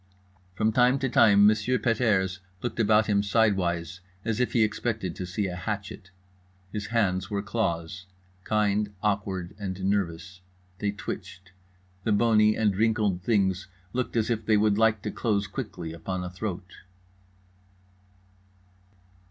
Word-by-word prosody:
From 110 Hz, +2 st, +2 dB
time 125 Hz, +3 st, +4 dB
to 135 Hz, -1 st, -1 dB
time 100 Hz, -3 st, +6 dB
M. 110 Hz, -, +5 dB, 0.2 s
Pet 115 Hz, 0 st, 0 dB
airs 95 Hz, -5 st, +1 dB, 0.2 s
looked 120 Hz, -, -3 dB
about 110 Hz, 0 st, +4 dB
him 100 Hz, -2 st, +2 dB
sidewise 95 Hz, -5 st, +1 dB, 0.3 s
as 115 Hz, -1 st, -1 dB
if 125 Hz, -, 0 dB
he 115 Hz, -, +4 dB
expected 110 Hz, -4 st, -2 dB
to 90 Hz, -, -5 dB
see 95 Hz, +3 st, -2 dB
a 90 Hz, -2 st, -3 dB
hatchet. 100 Hz, 0 st, -5 dB, 0.6 s
His 105 Hz, -1 st, -4 dB
hands 95 Hz, -5 st, 0 dB
were 100 Hz, -1 st, -2 dB
claws, 95 Hz, -3 st, -2 dB, 0.4 s
kind, 105 Hz, 0 st, +1 dB
awkward 100 Hz, -4 st, -1 dB
and 95 Hz, -2 st, -4 dB
nervous. 95 Hz, -2 st, -2 dB, 0.4 s
They 105 Hz, -, 0 dB
twitched. 95 Hz, -2 st, -7 dB, 0.5 s
The 110 Hz, -, +1 dB
bony 110 Hz, 0 st, +4 dB
and 105 Hz, -3 st, +2 dB
wrinkled 105 Hz, -3 st, +1 dB
things 95 Hz, -3 st, +1 dB, 0.3 s
looked 125 Hz, -1 st, -2 dB
as 115 Hz, +1 st, +1 dB
if 115 Hz, -1 st, -1 dB
they 110 Hz, 0 st, +3 dB
would 105 Hz, 0 st, +2 dB
like 110 Hz, -2 st, +3 dB
to 105 Hz, -, -3 dB
close 105 Hz, -3 st, 0 dB
quickly 95 Hz, -6 st, -6 dB
upon 90 Hz, +2 st, -4 dB
a 90 Hz, -, -5 dB
throat. 90 Hz, -1 st, -6 dB
100 Hz, 145 wpm, -27 LUFS, 95-110 Hz, 0.6 s, time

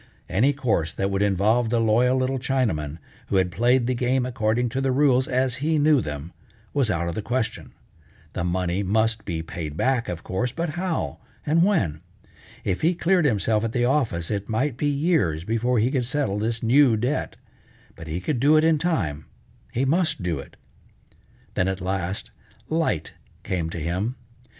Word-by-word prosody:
Any 115 Hz, +11 st, +3 dB
course 115 Hz, -, 0 dB
that 95 Hz, 0 st, -1 dB
would 95 Hz, 0 st, 0 dB
involve 105 Hz, +4 st, +2 dB
the 120 Hz, 0 st, +1 dB
loyal 120 Hz, +3 st, +3 dB
little 130 Hz, +1 st, 0 dB
Chinaman, 105 Hz, -, -1 dB, 0.3 s
who -, -, -1 dB
had 95 Hz, -2 st, +2 dB
played 120 Hz, +5 st, +3 dB
the 130 Hz, -, +1 dB
game 125 Hz, +1 st, +1 dB
according 120 Hz, -1 st, 0 dB
to 130 Hz, +3 st, -2 dB
the 135 Hz, -1 st, +1 dB
rules 130 Hz, -1 st, +3 dB
as 130 Hz, -1 st, 0 dB
he 155 Hz, +4 st, +1 dB
knew 150 Hz, -2 st, +4 dB
them, 75 Hz, 0 st, -6 dB, 0.4 s
was 140 Hz, -6 st, +1 dB
out 85 Hz, -3 st, 0 dB
of 85 Hz, -, -2 dB
the 110 Hz, -, -3 dB
question. 115 Hz, 0 st, -3 dB, 0.6 s
The -, -, -2 dB
money 90 Hz, +1 st, 0 dB
must 110 Hz, +2 st, +1 dB
be 80 Hz, -3 st, -3 dB
paid 80 Hz, -2 st, -6 dB
back, 130 Hz, 0 st, +1 dB
of 85 Hz, -2 st, -5 dB
course, 120 Hz, +6 st, -2 dB
but 165 Hz, +4 st, -2 dB
how, 175 Hz, +1 st, -2 dB, 0.3 s
and 160 Hz, +3 st, +3 dB
when? 145 Hz, -, +1 dB, 0.6 s
If 95 Hz, -2 st, -1 dB
he 170 Hz, +3 st, +2 dB
cleared 175 Hz, -1 st, +2 dB
himself 110 Hz, -3 st, +2 dB
at 115 Hz, 0 st, -2 dB
the 120 Hz, 0 st, +2 dB
office 120 Hz, -, 0 dB
it 100 Hz, -1 st, -3 dB
might 130 Hz, +4 st, 0 dB
be 145 Hz, +4 st, -1 dB
years 140 Hz, -, +1 dB
before 115 Hz, +5 st, 0 dB
he 115 Hz, +4 st, +2 dB
could 130 Hz, -4 st, 0 dB
settle 125 Hz, -7 st, -1 dB
this 115 Hz, +2 st, -2 dB
new 125 Hz, 0 st, +5 dB
debt, 125 Hz, +7 st, -1 dB, 0.6 s
but 80 Hz, -, -10 dB
he 80 Hz, +3 st, -3 dB
could 125 Hz, +7 st, -2 dB
do 145 Hz, +5 st, +5 dB
it 155 Hz, -, +4 dB
in 160 Hz, -2 st, +3 dB
time, 80 Hz, -, -1 dB, 0.5 s
he 130 Hz, +3 st, 0 dB
must 160 Hz, -, +1 dB
do 85 Hz, -5 st, -1 dB
it. 70 Hz, -, -11 dB, 1.0 s
Then 90 Hz, -, +1 dB
at 95 Hz, 0 st, -2 dB
last, 95 Hz, 0 st, -3 dB, 0.4 s
light 160 Hz, -, 0 dB, 0.3 s
came 85 Hz, -4 st, -2 dB
to 80 Hz, -, -6 dB
him. 90 Hz, +10 st, -2 dB
115 Hz, 185 wpm, -24 LUFS, 95-135 Hz, 1.0 s, new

